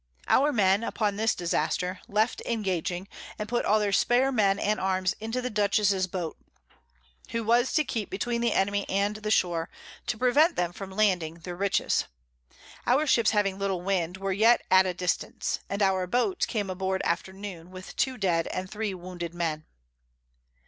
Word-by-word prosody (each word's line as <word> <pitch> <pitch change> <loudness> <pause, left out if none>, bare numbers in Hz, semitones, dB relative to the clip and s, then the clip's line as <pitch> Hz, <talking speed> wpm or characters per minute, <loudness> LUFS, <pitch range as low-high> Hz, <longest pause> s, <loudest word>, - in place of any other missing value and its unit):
Our 290 +3 +4
Men, 200 -3 +3
upon 210 -3 -1
this 220 +2 +1
Disaster, 180 +2 -1
left 215 +3 0
engaging, 190 -4 -2 0.3
and 210 - -4
put 240 +2 -1
all 215 +1 +4
their 205 -1 0
spare 245 +6 +3
Men 200 -5 +2
and 210 +1 0
Arms 185 -1 0
into 225 +3 -3
the 250 - -2
Dutchess's 200 -2 +2
Boat; 175 -3 -4 0.9
who 230 0 -2
was 240 +3 +3
to 310 - +3
keep 225 -7 -3
between 235 +4 -2
the 235 -2 +2
Enemy 200 +1 0
and 200 +2 0
the 215 0 -4
Shore, 175 -5 +1 0.4
to 240 - -1
prevent 285 +8 +4
them 175 -1 -1
from 195 +1 -7
landing 190 -5 +1
their 175 +1 -8
Riches. 195 +2 +1 0.8
Our 270 +5 +3
Ships 230 -6 +4
having 200 -2 +1
little 195 -3 -1
Wind, 180 -2 -1
were 195 0 -2
yet 225 +5 +4
at 190 0 +6
a 180 - -2
distance; 180 -1 -2
and 200 +1 0
our 190 -1 +2
Boat 250 - +1
came 205 -5 -2
aboard 190 +1 -2
after 170 +2 -1
noon, 190 -3 -8
with 185 0 -10
two 260 -1 0
dead 175 -6 +1
and 185 0 -4
three 210 -2 -3
wounded 175 -1 -7
Men. 160 -3 -2
195 Hz, 175 wpm, -27 LUFS, 185-220 Hz, 0.9 s, at